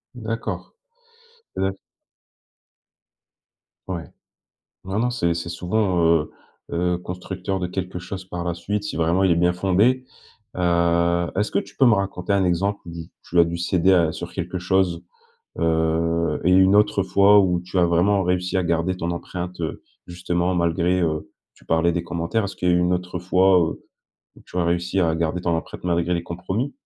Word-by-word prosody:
D'accord. 115 -1 -5 0.8
Heu 95 0 -1 2.1
Ouais. 85 -4 -4 0.8
Non 95 +3 -2
non, 125 - +1
c'est 85 -8 0
c'est 85 0 -4
souvent, 90 0 0 0.2
heu, - - -14 0.4
heu, 90 +1 0
constructeur 90 +1 -5
de 90 - -2
quelque 90 0 -4
chose 95 +1 -7
par 90 -2 -5
la 85 0 -1
suite, 105 +4 -3
si 105 - -5
vraiment 85 +3 +2
il 95 - +4
est - - +4
bien 90 +1 +2
fondé, 100 +8 +2 0.5
heu, 85 -1 +2
est-ce 105 +2 0
que - - +1
tu - - -13
peux 135 - +5
me 115 - +6
raconter 100 -1 -2
un 100 -1 +2
exemple 95 +3 0
où - - -7 0.3
tu 90 - -2
as 85 - +8
dû 85 +1 -3
céder 90 +2 +2
à 85 -3 +3
sur 85 -1 -7
quelque 90 0 -4
chose, 95 -1 +1 0.6
heu 80 0 +1
et 90 - +3
une 95 +1 +5
autre 105 -1 +3
fois, 100 +2 +5
où 90 -3 +2
tu 95 +1 -5
as 90 - +5
vraiment 90 +4 +2
réussi 90 +1 0
à 95 - +1
garder 85 +2 0
ton 85 0 -2
empreinte, 90 +1 -6
heu, 80 - -4 0.2
justement 90 +1 -1
malgré, 85 +1 +1
heu, 80 -2 -1 0.2
tu - - -23
parlais 80 +1 +2
des 85 0 -2
commentaires, 85 +6 -2
est-ce 100 - -6
qu'il 90 - 0
y - - +5
a - - +4
une 90 0 +2
autre 90 0 -3
fois, 95 +1 +4
heu, 80 -2 -2 0.5
où - - -16
tu - - -10
as 85 - +2
réussi 85 +2 0
à 85 -2 +2
garder 85 +1 -1
ton 85 -1 0
empreinte 80 - -7
malgré 85 0 0
les 85 - -2
compromis? 95 +9 -3
90 Hz, 185 wpm, -22 LUFS, 85-95 Hz, 2.1 s, as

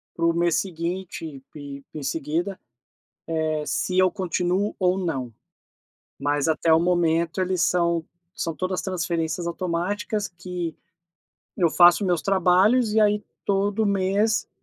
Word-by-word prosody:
para 165 - 0
o 170 - +3
mês 170 -1 +2
seguinte 175 -1 -3
ep 140 -1 -10
e 155 - -5
em - - -6
seguida, 165 +7 -2 0.8
eh, 155 -1 -1
se 185 0 -1
eu 185 0 +5
continuo 185 +1 -1
ou 180 -1 +2
não. 140 -10 -3 0.9
Mas 145 +2 0
até 160 +1 +2
o 160 - +6
momento 170 0 +1
eles 185 -1 0
são 170 -2 +1 0.3
são 165 -5 -2
todas 185 +2 -2
transferências 170 -2 -2
automáticas, 185 +5 -2
que 175 -1 -5 0.8
eu 170 -4 +3
faço 175 +4 +6
meus 175 -3 +1
trabalhos, 195 +5 +3
e 220 - +3
aí 210 0 +3 0.2
todo 205 +2 +1
mês 200 +2 +1
175 Hz, 135 wpm, -24 LUFS, 165-190 Hz, 0.9 s, o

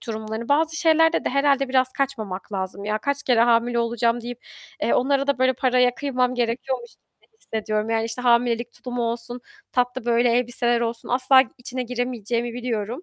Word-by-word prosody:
tulumlarını. 220 +1 -5
Bazı 315 +2 +2
şeylerde 325 0 +3
de - - +1
herhâlde 275 -1 +2
biraz 255 0 +2
kaçmamak 220 -9 -4
lazım. 190 +1 -4
"Ya, 215 +1 -1
kaç 280 +4 -2
kere 240 -3 +3
hamile 235 0 +3
olacağım." 235 0 0
deyip, 245 +1 -7 0.4
eee, - - +2
onlara 275 +2 +1
da 280 -2 +1
böyle 260 0 +3
paraya 250 -1 +2
kıymam 255 -3 0
gerekiyormuş 240 +1 -2 0.3
gibi - - -32
hissediyorum. 215 0 -3
Yani, 225 0 +1
işte, 230 +2 -5
hamilelik 240 -1 +2
tulumu 245 -1 -5
olsun, 235 +1 -4 0.3
tatlı 250 -1 0
böyle 240 0 +3
elbiseler 240 0 +1
olsun 230 0 -3
asla 260 +1 +5 0.2
içine 250 +1 -5
giremeyeceğimi 240 -1 -3
biliyorum. 240 - -3
245 Hz, 165 wpm, -23 LUFS, 230-260 Hz, 0.4 s, asla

